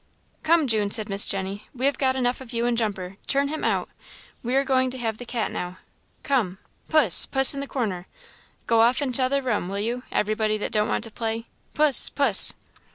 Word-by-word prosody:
"Come, 325 Hz, -1 st, +1 dB
June," 215 Hz, -5 st, -1 dB
said 215 Hz, +1 st, +1 dB
Miss 195 Hz, +1 st, +2 dB
Jenny, 195 Hz, +1 st, -5 dB
"we 255 Hz, +1 st, -4 dB
have 280 Hz, -1 st, -1 dB
got 260 Hz, -1 st, 0 dB
enough 250 Hz, 0 st, -2 dB
of 250 Hz, -2 st, -12 dB
you 235 Hz, 0 st, -2 dB
and 240 Hz, -1 st, -1 dB
Jumper 195 Hz, -5 st, -4 dB
turn 280 Hz, 0 st, -1 dB
him 315 Hz, +1 st, -6 dB
out; -, -, -1 dB, 0.5 s
we 245 Hz, +2 st, -4 dB
are 275 Hz, -, +2 dB
going 260 Hz, -1 st, 0 dB
to 260 Hz, -, -9 dB
have 225 Hz, -3 st, -5 dB
the 245 Hz, -, -10 dB
cat 235 Hz, -2 st, -4 dB
now. 180 Hz, +1 st, -7 dB, 0.5 s
Come! 225 Hz, -10 st, -2 dB, 0.3 s
Puss, 295 Hz, -, +6 dB
puss 270 Hz, +1 st, +5 dB
in 280 Hz, -, -7 dB
the 280 Hz, -, -6 dB
corner! 200 Hz, -10 st, -5 dB, 0.6 s
Go 230 Hz, -1 st, +2 dB
off 245 Hz, +5 st, +1 dB
in 260 Hz, -3 st, -4 dB
t'other 270 Hz, +2 st, 0 dB
room, 210 Hz, -8 st, -3 dB
will 200 Hz, -, -5 dB
you, 235 Hz, +4 st, -4 dB
everybody 215 Hz, 0 st, -2 dB
that 210 Hz, -, -6 dB
don't 210 Hz, -1 st, -1 dB
want -, -, -3 dB
to 225 Hz, -, -8 dB
play. 225 Hz, +1 st, -5 dB, 0.3 s
Puss, 300 Hz, -3 st, +5 dB
puss!" 270 Hz, -9 st, +6 dB
235 Hz, 210 wpm, -23 LUFS, 210-265 Hz, 0.6 s, Puss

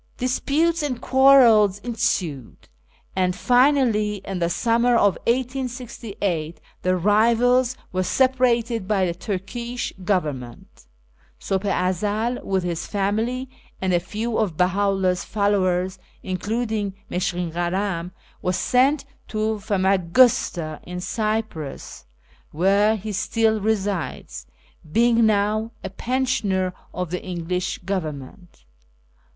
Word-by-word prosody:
Disputes 300 Hz, +6 st, +1 dB
and 270 Hz, -5 st, -2 dB
quarrels 250 Hz, -7 st, +5 dB
ensued, 200 Hz, -, -3 dB, 0.5 s
and 180 Hz, -1 st, +1 dB
finally, 245 Hz, -3 st, +3 dB
in 195 Hz, -2 st, -4 dB
the 170 Hz, -1 st, +1 dB
summer 235 Hz, +5 st, +2 dB
of 205 Hz, -3 st, +5 dB, 0.2 s
1868, 235 Hz, -, -2 dB, 0.2 s
the 185 Hz, 0 st, +1 dB
rivals 235 Hz, +6 st, +3 dB
were 185 Hz, -, 0 dB
separated 240 Hz, -2 st, +1 dB
by 195 Hz, -3 st, +2 dB
the 170 Hz, -, -1 dB
Turkish 230 Hz, +7 st, -4 dB
Government. 145 Hz, -, -3 dB, 0.5 s
Sulh 195 Hz, +1 st, -2 dB
i 180 Hz, -2 st, +1 dB
Ezel, 215 Hz, +6 st, -2 dB
with 190 Hz, -2 st, -1 dB
his 175 Hz, -1 st, -3 dB
family 220 Hz, +6 st, -1 dB, 0.3 s
and 190 Hz, -1 st, 0 dB
a 175 Hz, -, +4 dB
few 220 Hz, +6 st, -3 dB
of 190 Hz, -8 st, -1 dB
BeJui' 180 Hz, 0 st, +3 dB
\i 200 Hz, 0 st, +2 dB
lUili 190 Hz, -2 st, +2 dB
s 180 Hz, -, -3 dB
followers, 190 Hz, -2 st, 0 dB, 0.2 s
including 205 Hz, +1 st, -2 dB, 0.2 s
MusKkin 180 Hz, -2 st, -1 dB
Kalam, 175 Hz, 0 st, -1 dB, 0.3 s
was 180 Hz, 0 st, 0 dB
sent 275 Hz, +3 st, +2 dB, 0.2 s
to 215 Hz, 0 st, -1 dB
Famagusta, 190 Hz, -4 st, +2 dB
in 180 Hz, 0 st, -7 dB
Cyprus, 215 Hz, -, -4 dB, 0.4 s
where 200 Hz, +6 st, +3 dB
he 215 Hz, +1 st, -5 dB
still 220 Hz, +2 st, +1 dB
resides, 200 Hz, -4 st, -2 dB, 0.4 s
being 230 Hz, +2 st, +4 dB
now 215 Hz, +2 st, +1 dB
a 190 Hz, -, -5 dB
pensioner 210 Hz, -6 st, -1 dB, 0.2 s
of 180 Hz, -2 st, -4 dB
the 180 Hz, -, -3 dB
English 180 Hz, 0 st, -3 dB
Government. 160 Hz, -, -6 dB
205 Hz, 110 wpm, -23 LUFS, 180-235 Hz, 0.5 s, quarrels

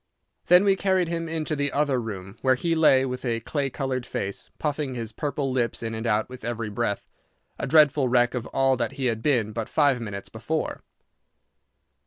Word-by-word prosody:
Then 180 Hz, +2 st, +7 dB
we 195 Hz, -1 st, +4 dB
carried 190 Hz, -3 st, +1 dB
him 165 Hz, -1 st, -3 dB
into 160 Hz, -1 st, -2 dB
the 145 Hz, -1 st, -1 dB
other 140 Hz, -3 st, +1 dB
room, 95 Hz, -4 st, -7 dB
where 130 Hz, -1 st, +4 dB
he 165 Hz, +6 st, 0 dB
lay 150 Hz, -5 st, +5 dB
with 125 Hz, -1 st, -4 dB
a 115 Hz, -3 st, 0 dB
clay 140 Hz, +3 st, -2 dB
coloured 130 Hz, -1 st, -2 dB
face, 100 Hz, -4 st, -5 dB
puffing 145 Hz, -3 st, -2 dB
his 115 Hz, -2 st, -4 dB
purple 140 Hz, +1 st, -2 dB
lips 120 Hz, -2 st, -1 dB
in 115 Hz, 0 st, -3 dB
and 110 Hz, +1 st, -3 dB
out 110 Hz, -1 st, +1 dB
with 125 Hz, -2 st, -11 dB
every 115 Hz, -1 st, -3 dB
breath—a 105 Hz, -1 st, -5 dB
dreadful 150 Hz, -4 st, +5 dB
wreck 120 Hz, 0 st, +3 dB
of 120 Hz, -2 st, -3 dB
all 135 Hz, 0 st, +2 dB
that 120 Hz, +2 st, -2 dB
he 135 Hz, -1 st, -3 dB
had 115 Hz, -3 st, 0 dB
been 115 Hz, -6 st, +1 dB
but 115 Hz, 0 st, -4 dB
five 140 Hz, -5 st, +3 dB
minutes 100 Hz, -3 st, -6 dB
before. -, -, -3 dB
130 Hz, 190 wpm, -25 LUFS, 115-150 Hz, -, Then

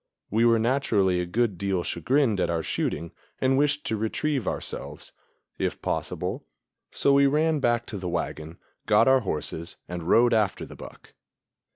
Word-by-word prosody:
We 115 Hz, +3 st, +3 dB
were 115 Hz, -1 st, +5 dB
naturally 110 Hz, -7 st, +1 dB
a 90 Hz, -, -4 dB
good 105 Hz, -1 st, 0 dB
deal 95 Hz, -3 st, -1 dB
chagrined 115 Hz, -, +1 dB
at -, -, +1 dB
our 85 Hz, -1 st, -1 dB
shooting 85 Hz, +2 st, -2 dB, 0.3 s
and 130 Hz, 0 st, +2 dB
wished 145 Hz, +1 st, +1 dB
to 110 Hz, -, -1 dB
retrieve 120 Hz, +4 st, -1 dB
ourselves, -, -, -5 dB, 0.5 s
if -, -, -2 dB
possible; -, -, -3 dB, 0.5 s
so 140 Hz, -, +2 dB
we 140 Hz, 0 st, +5 dB
ran 155 Hz, +2 st, +2 dB
back 120 Hz, -3 st, +1 dB
to 105 Hz, -, -6 dB
the 90 Hz, -1 st, -4 dB
wagon, 85 Hz, -1 st, -4 dB, 0.3 s
got -, -, +5 dB
our 130 Hz, 0 st, +6 dB
horses 85 Hz, -, -4 dB
and 85 Hz, -1 st, -5 dB
rode 120 Hz, +1 st, +5 dB
after 105 Hz, -4 st, +1 dB
the -, -, -12 dB
buck. -, -, -13 dB
110 Hz, 165 wpm, -26 LUFS, 90-135 Hz, 0.5 s, our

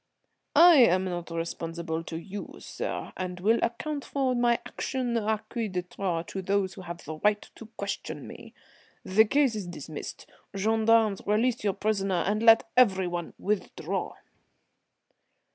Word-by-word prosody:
"I 345 Hz, -2 st, +9 dB
am 190 Hz, -7 st, +5 dB
not 175 Hz, -2 st, -4 dB
responsible 165 Hz, 0 st, -4 dB
to 165 Hz, -, -5 dB
you, 195 Hz, +4 st, -7 dB
sir, -, -, -5 dB
and 180 Hz, -1 st, -4 dB
will 220 Hz, +5 st, +3 dB
account 285 Hz, +5 st, -2 dB
for 270 Hz, -2 st, 0 dB
my 240 Hz, -1 st, +3 dB
action 255 Hz, -3 st, -3 dB
à 220 Hz, -2 st, 0 dB
qui 230 Hz, -1 st, -3 dB
de 180 Hz, -1 st, -2 dB
droit, 175 Hz, -2 st, -3 dB
to 190 Hz, -, -4 dB
those 195 Hz, 0 st, 0 dB
who 190 Hz, -, -10 dB
have 170 Hz, -1 st, -8 dB
the 155 Hz, +1 st, -6 dB
right 210 Hz, +4 st, +1 dB
to 225 Hz, -, -12 dB
question 200 Hz, 0 st, -5 dB
me. -, -, -12 dB, 0.5 s
The 215 Hz, +4 st, +5 dB
case 275 Hz, +1 st, +2 dB
is 205 Hz, -4 st, -4 dB
dismissed. 155 Hz, -3 st, -7 dB, 0.3 s
Gendarmes, 220 Hz, 0 st, +3 dB
release 230 Hz, +3 st, +1 dB
your 200 Hz, -2 st, +1 dB
prisoner, 195 Hz, -4 st, 0 dB
and 210 Hz, +2 st, 0 dB
let 225 Hz, 0 st, +6 dB
everyone 190 Hz, -8 st, +2 dB
withdraw." 210 Hz, 0 st, -3 dB
200 Hz, 145 wpm, -28 LUFS, 180-230 Hz, 0.5 s, I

